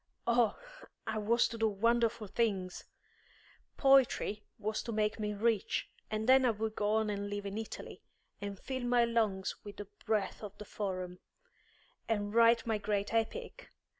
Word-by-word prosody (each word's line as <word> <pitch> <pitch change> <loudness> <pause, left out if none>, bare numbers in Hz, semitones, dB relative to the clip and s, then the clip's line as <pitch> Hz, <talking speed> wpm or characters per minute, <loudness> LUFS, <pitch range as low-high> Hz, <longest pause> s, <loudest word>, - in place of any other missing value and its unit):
Oh, 235 -3 +3 0.5
I 220 -1 -2
was 230 +3 +3
to 230 - -7
do 225 - +3
wonderful 230 +2 +1
things! 195 -3 -1 0.9
Poetry 265 -6 +4
was 215 0 -2
to 235 - -5
make 215 0 0
me 210 -1 -2
rich, 220 -1 0 0.2
and 215 +1 -2
then 260 +1 +7
I 250 - +4
would 220 0 -2
go 210 +1 +2
and 205 -2 -1
live 205 0 -4
in 200 0 -4
Italy, 220 0 -6 0.4
and 200 -1 -4
fill 260 -1 -4
my 245 -1 +3
lungs 220 -5 0
with 205 -1 -9
the 205 - -6 0.2
breath 210 -3 0
of 205 -1 -8
the 210 - -8
Forum, 185 -3 -4 0.9
and 205 -2 0
write 230 0 +5
my 220 -2 0
great 205 0 -1
Epic. 230 - -2
215 Hz, 160 wpm, -33 LUFS, 205-230 Hz, 0.9 s, then